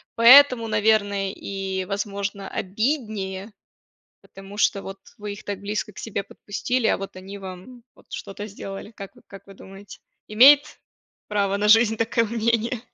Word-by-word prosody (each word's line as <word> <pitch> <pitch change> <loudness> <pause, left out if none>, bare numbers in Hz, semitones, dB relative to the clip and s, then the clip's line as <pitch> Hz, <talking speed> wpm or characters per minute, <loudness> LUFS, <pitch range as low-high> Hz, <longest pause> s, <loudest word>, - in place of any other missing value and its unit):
поэтому, 250 0 +7
наверное, 205 -2 +1
и 190 -2 -5
возможно 200 0 -4
обиднее. 210 -2 -3 0.7
Потому 195 +1 -13
что, 200 -1 +1
вот, 195 0 -8 0.2
вы 210 0 -6
их 205 - -13
так 200 -1 -5
близко 210 +1 -4
к - - -14
себе 200 -3 -4
подпустили, 235 +4 -3
а - - +2
вот 195 0 -8
они 195 +2 -9
вам, 190 +6 -10
вот, - - -23
что-то 205 +1 -7
сделали. 195 0 -8
Как 200 -4 -11
вы - - -20
как 195 0 -13
вы 195 - -13
думаете? 195 +1 -13 0.3
Имеет 280 +7 +6 0.5
право 200 -1 0
на 210 +1 +1
жизнь 225 0 +5
такое 230 +1 +1
мнение? 230 +1 -1
205 Hz, 155 wpm, -23 LUFS, 195-225 Hz, 0.7 s, поэтому